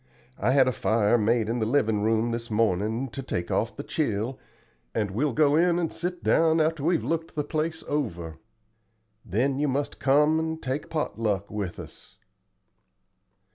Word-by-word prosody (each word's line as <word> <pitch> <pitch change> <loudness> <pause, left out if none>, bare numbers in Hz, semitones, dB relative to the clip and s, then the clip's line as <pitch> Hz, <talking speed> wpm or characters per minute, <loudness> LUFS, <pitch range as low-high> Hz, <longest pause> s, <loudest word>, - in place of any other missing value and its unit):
I 105 - +1
had 135 -2 +5
a - - +3
fire 110 -1 +2
made 115 0 +2
in 120 +2 -1
the 110 - +1
livin' 110 -5 +2
room 110 +2 +1
this 115 +1 -4
mornin', 110 +3 0
to 135 - -6
take 85 -9 -3
off 115 - 0
the 140 - -6
chill, 125 -5 -2 0.6
and 105 -3 0
we'll 140 +9 0
go 145 +3 +3
in 170 +1 +3
and 170 -2 -1
sit 180 0 -4
down 165 0 +3
after 155 -2 +1
we've 170 +1 +2
looked 165 +5 -2
the 150 - 0
place 160 +2 -2
over. 85 - -3 0.8
Then 125 +7 0
you 150 - +1
must 140 +2 -2
come 150 +3 +4
and 160 0 -2
take 135 +2 -4
pot 155 -7 -3
luck 100 -3 -1
with 100 -4 -4
us." - - -12
130 Hz, 175 wpm, -26 LUFS, 110-155 Hz, 0.8 s, had